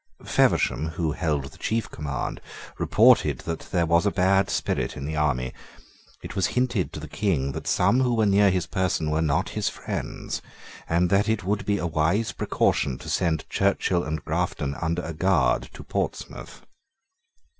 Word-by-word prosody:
Feversham, 80 - +2
who 80 0 -2
held 75 -4 -1
the - - -17
chief 115 0 -1
command, 70 -4 -4 0.4
reported - - +4
that 80 0 -5
there 85 -2 +2
was 85 +4 +3
a - - +2
bad 95 +1 +3
spirit - - -1
in 70 - -5
the 80 +1 -3
army. 65 -4 0 0.7
It - - -7
was 95 -5 +2
hinted 125 -7 +1
to - - -5
the 75 - -8
King 75 -6 0
that - - -6
some 130 - +3
who 125 -2 +2
were 110 -1 +3
near 100 0 +5
his 90 -2 0
person 90 -4 -1
were 80 +1 +1
not 75 -3 +1
his - - -1
friends, - - -5 0.5
and 85 +2 +2
that 100 +2 +3
it 110 -4 0
would 100 +1 -2
be 100 0 +2
a 85 - -2
wise 85 +7 +1
precaution 65 -3 0
to - - -9
send 80 -4 0
Churchill 95 -2 +1
and 75 0 -4
Grafton 70 -1 -1
under 85 +1 -1
a 85 - -5
guard 95 +5 +2
to - - -9
Portsmouth. - - -5
85 Hz, 175 wpm, -25 LUFS, 75-100 Hz, 0.7 s, near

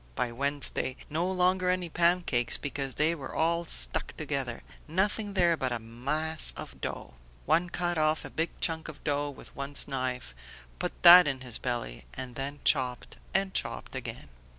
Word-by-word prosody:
By 120 - -1
Wednesday, 140 0 -1 0.2
no 170 +4 0
longer 185 0 +2
any 180 -1 0
pancakes, 170 -8 +2
because 135 -2 -3
they 155 +2 +2
were 140 -5 -7
all 170 +1 +1
stuck - - +1
together; - - -3 0.2
nothing 205 +5 0
there 175 -3 +3
but 130 -5 -2
a 120 - 0
mass 140 +8 +1
of - - -9
dough. - - -5 0.3
One 165 +4 +2
cut 175 -1 -1
off 155 0 +1
a - - -8
big 165 +1 0
chunk 160 -1 0
of 155 - -10
dough 145 -1 0
with 140 - -12
one's 140 +1 0
knife, 130 - -3 0.5
put - - -4
that 180 -1 +11
in 135 -2 -2
his 125 -3 -3
belly, 120 - -4
and 125 -1 -5
then 140 +3 -5
chopped 125 -4 0 0.2
and 195 0 +1
chopped - - -3
again!" - - -6
150 Hz, 170 wpm, -29 LUFS, 130-170 Hz, 0.5 s, that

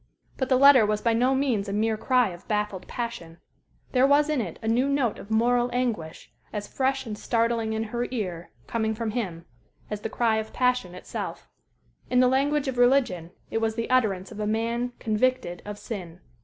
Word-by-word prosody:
But 260 - -2
the 260 - +5
letter 275 -3 +8
was 210 0 +1
by 230 +1 +1
no 250 +4 +3
means 240 -7 0
a - - -3
mere 220 +2 +1
cry 245 +1 +2
of 175 0 -11
baffled 210 -3 -2
passion. 200 -9 -5 0.5
There 260 +1 +4
was 290 +2 +4
in 290 -5 +1
it 175 -7 -5
a - - -3
new 245 +5 +2
note 275 -6 0
of 205 - -11
moral 240 +2 +2
anguish, 230 -11 -3 0.2
as 205 -1 -4
fresh 270 0 -1
and 215 -2 -4
startling 230 0 0
in 220 0 -1
her 240 +2 -3
ear, 185 -9 -4 0.2
coming 220 -1 -1
from 225 -1 -2
him, 185 -8 -4 0.5
as 210 -1 -3
the 225 - -3
cry 225 0 +1
of 220 0 -4
passion 250 -8 +1
itself. 180 - -6 0.6
In 250 - +3
the 255 - +6
language 280 +3 +1
of 255 -2 -2
religion, 245 -10 +3 0.2
it 225 - 0
was 225 -1 0
the 230 +2 -3
utterance 205 -7 +1
of 215 - -9
a 210 - -1
man 235 +3 -1
"convicted 220 -5 0
of 205 0 -6
sin." 180 -6 -7
225 Hz, 195 wpm, -26 LUFS, 210-250 Hz, 0.6 s, letter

